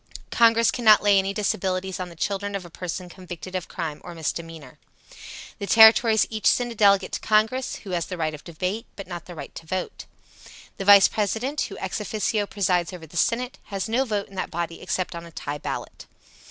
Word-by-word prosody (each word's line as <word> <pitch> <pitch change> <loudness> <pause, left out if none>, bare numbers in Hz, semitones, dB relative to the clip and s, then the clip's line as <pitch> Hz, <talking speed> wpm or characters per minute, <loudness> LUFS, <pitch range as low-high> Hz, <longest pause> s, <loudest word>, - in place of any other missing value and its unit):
Congress 230 -1 +4
cannot 220 -4 +5
lay 200 -1 +5
any 195 +1 -1
disabilities 190 -2 -2
on 180 -1 -4
the 170 - -13
children 200 +3 -2
of 190 -3 -5
a 170 - -12
person 180 +1 -5
convicted 180 0 -9
of 185 -2 -3
crime 160 -5 -5
or 175 -1 -9
misdemeanor. 160 -3 -6 0.8
The 200 - -4
Territories 220 0 +7
each 220 -1 -1
send 245 -1 +2
a - - -8
delegate 200 -2 +4
to - - -3
Congress, 220 +4 +1
who 195 - -9
has 170 -2 -1
the 180 - -5
right 155 -2 -1
of 150 - -10
debate, 180 +6 -4
but 195 - -8
not 175 -2 -7
the 175 - -10
right - - -8
to 165 - -10
vote. 185 +1 -4 0.7
The 195 - -5
Vice 200 -1 +9
President, 225 +8 -2
who - - -4
ex - - -4
officio 210 0 -1
presides 180 -4 0
over 175 -3 -9
the 160 - -16
Senate, 245 +7 0
has 195 -1 -4
no 235 +4 +1
vote 210 -5 -2
in - - -18
that 190 - -3
body 170 0 -4
except 185 -1 -2
on 170 0 -7
a - - -14
tie 145 -2 -5
ballot. - - -6
190 Hz, 205 wpm, -24 LUFS, 175-215 Hz, 0.8 s, Vice